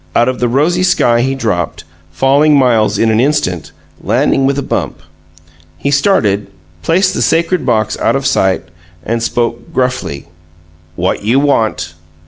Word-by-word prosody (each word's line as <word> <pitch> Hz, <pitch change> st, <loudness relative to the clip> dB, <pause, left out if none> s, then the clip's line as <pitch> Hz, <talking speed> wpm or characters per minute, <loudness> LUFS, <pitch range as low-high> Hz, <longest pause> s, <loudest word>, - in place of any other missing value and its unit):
Out 120 Hz, -, +3 dB
of 130 Hz, -1 st, -2 dB
the 125 Hz, -, +1 dB
rosy 155 Hz, +8 st, +1 dB
sky 145 Hz, -10 st, +2 dB
he 135 Hz, +2 st, -1 dB
dropped, 105 Hz, -10 st, -2 dB, 0.3 s
falling 140 Hz, -, +3 dB
miles 120 Hz, -5 st, +2 dB
in 115 Hz, -1 st, +2 dB
an 110 Hz, -, +2 dB
instant, 120 Hz, -, -1 dB, 0.3 s
landing 135 Hz, +5 st, +1 dB
with 140 Hz, 0 st, 0 dB
a 140 Hz, -, -2 dB
bump. -, -, -3 dB, 0.8 s
He 140 Hz, -, -2 dB
started, 110 Hz, -, +1 dB, 0.3 s
placed 185 Hz, -, +1 dB
the -, -, -2 dB
sacred 170 Hz, -2 st, +1 dB
box 110 Hz, -3 st, +1 dB
out -, -, +1 dB
of 135 Hz, 0 st, -2 dB
sight, 95 Hz, -8 st, +1 dB, 0.4 s
and 115 Hz, +1 st, -2 dB
spoke 115 Hz, +6 st, -2 dB
gruffly. 125 Hz, -, -2 dB, 0.7 s
"What 90 Hz, +2 st, -1 dB
you 115 Hz, +6 st, +2 dB
want?" 115 Hz, -, 0 dB
125 Hz, 150 wpm, -13 LUFS, 110-140 Hz, 0.8 s, Out